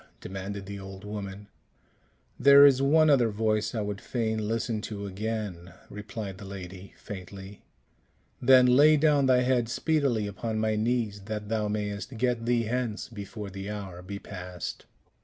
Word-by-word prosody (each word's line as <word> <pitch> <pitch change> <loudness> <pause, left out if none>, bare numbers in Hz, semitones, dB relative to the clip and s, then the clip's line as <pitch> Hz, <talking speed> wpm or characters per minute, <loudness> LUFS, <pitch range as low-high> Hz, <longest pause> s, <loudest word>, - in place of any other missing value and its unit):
demanded 95 +1 -6
the 100 0 -7
old 95 0 -9
woman. 100 -1 -6 0.9
"There 140 0 +9
is 135 -2 +5
one 155 +3 +5
other 130 -6 +4
voice 110 +1 0
I 110 - 0
would 105 -2 -4
fain 110 -3 -2
listen 115 0 -1
to 100 -2 -5
again," 100 -3 -5 0.2
replied 105 -1 -7
the 100 - -9
lady, 95 0 -9
faintly. 95 +1 -9 0.8
"Then, 130 0 +7
lay 145 +5 +6
down 145 -2 +3
thy 125 -1 +5
head 125 -2 +1
speedily 135 -5 +1
upon 110 +2 -4
my 110 0 +1
knees, 110 -2 -1
that 105 -1 -5
thou 110 -1 0
mayst 105 +3 -4
get 120 -1 0
thee 120 -1 +2
hence 115 -1 -3
before 105 -2 -7
the 95 +1 -6
hour 95 -4 -6
be 100 +2 -6
past." 90 -3 -7
105 Hz, 155 wpm, -28 LUFS, 100-120 Hz, 0.9 s, There